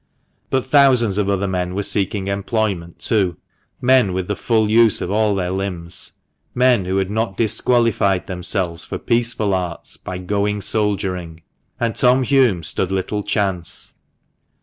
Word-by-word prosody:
But 130 -1 0
thousands 130 -7 +4
of 100 -1 0
other 100 0 0
men 90 -1 -2
were 100 - -1
seeking 100 0 -1
employment 100 -3 -2
too 95 -7 0 0.2
— - - -43
men 125 -8 +4
with 90 -1 -2
the 105 - -1
full 110 0 +1
use 110 0 +4
of 90 - -3
all 105 -1 +2
their 90 -2 -2
limbs 95 -3 -3 0.2
— - - -51
men 125 -6 +3
who 95 +1 -1
had 95 0 -1
not 110 -2 -2
disqualified 110 -4 +2
themselves 90 -2 -2
for - - -5
peaceful 115 -4 0
arts 90 -2 -4
by 90 - -6
"going 100 +2 -1
soldiering," 95 -6 -2 0.4
and 115 -1 -1
Tom 130 0 +3
Hulme 125 -10 +2
stood 90 +4 -1
little 95 +2 -2
chance. 100 -5 -2
100 Hz, 155 wpm, -19 LUFS, 90-115 Hz, 0.4 s, thousands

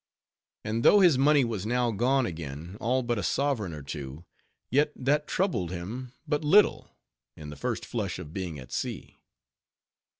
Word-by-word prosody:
And 110 +2 -1
though 205 - +7
his 170 -8 +5
money 145 -1 +5
was 110 -5 -3
now 120 +2 +1
gone 125 +5 +2
again, 80 0 -6
all 125 +3 +1
but 120 -2 -1
a - - -1
sovereign 120 - 0
or 75 -3 -8
two, 70 +2 -7 0.5
yet 145 +4 +3
that 145 +3 0
troubled 170 - 0
him 105 +9 -6 0.2
but 150 0 0
little, 195 +8 +4 0.5
in 75 -1 -8
the - - -8
first 70 - -3
flush - - -3
of 75 - -9
being 90 -5 -4
at 65 -2 -11
sea. - - -5
115 Hz, 165 wpm, -28 LUFS, 85-140 Hz, 0.5 s, though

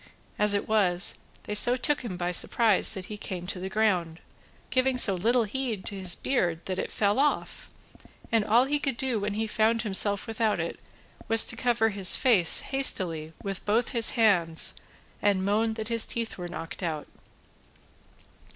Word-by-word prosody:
As 210 -1 +3
it 200 - -3
was, 195 -4 +2 0.2
they - - -6
so 240 +4 +3
took 295 +3 +1
him 215 -8 -7
by 175 0 -3
surprise 215 +3 +3
that 190 -2 -7
he 210 - -9
came 185 -4 -7
to 180 0 -7
the 190 +1 -6
ground, 185 -6 -1 0.5
giving 255 0 0
so 210 -5 +5
little 230 +7 0
heed 225 -2 -5
to 200 - -1
his 185 -2 -2
beard 175 -11 -2
that 185 -1 -5
it - - -5
fell 205 +3 -1
off, 295 +1 -2 0.6
and 225 -2 +1
all 235 +5 +2
he 290 +2 -2
could 275 -5 -3
do 255 -4 -2
when 205 0 -4
he 220 +1 -2
found 220 +1 0
himself 200 -1 0
without 225 -1 -2
it - - -5 0.5
was 225 0 +5
to - - +1
cover 235 -1 0
his 195 -3 +3
face 210 -11 +6
hastily 175 - +2
with 195 -1 -6
both 225 +3 -1
his 230 -2 +6
hands 175 -8 +1 0.5
and 195 -2 0
moan 220 +2 -1
that 220 0 -5
his 230 -1 +1
teeth 230 -1 -5
were 175 -1 -8
knocked 165 0 -9
out. 160 -4 -5
210 Hz, 180 wpm, -26 LUFS, 185-230 Hz, 0.6 s, face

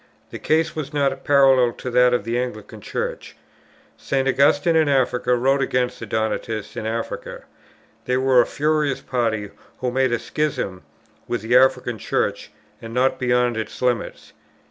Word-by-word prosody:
The - - -7
case 160 +1 +1
was 150 -1 -5
not 140 -1 0
parallel 135 -4 +4
to 125 - -6
that 125 0 +4
of 125 -4 0
the 115 +3 -1
Anglican 125 -5 -6
Church. - - -5 0.6
St. 135 -1 -1
Augustine 145 +4 +3
in 160 -2 +3
Africa 125 -2 +1
wrote 135 +3 +2
against 125 -1 -1
the - - -7
Donatists 110 -1 -3
in 110 - -4
Africa. 115 +1 -5 0.6
They 125 0 +1
were 130 -1 +4
a - - -1
furious 150 -2 0
party 110 -5 -2 0.3
who 125 -1 -2
made 130 0 +1
a 120 - +1
schism 125 -11 -3 0.5
within 115 -1 -4
the 125 - +7
African 125 -3 +2
Church, - - -2 0.3
and 115 +1 -8
not 130 +1 +1
beyond 125 -2 +1
its 110 - -5
limits. 125 -3 -2
125 Hz, 160 wpm, -22 LUFS, 120-135 Hz, 0.6 s, the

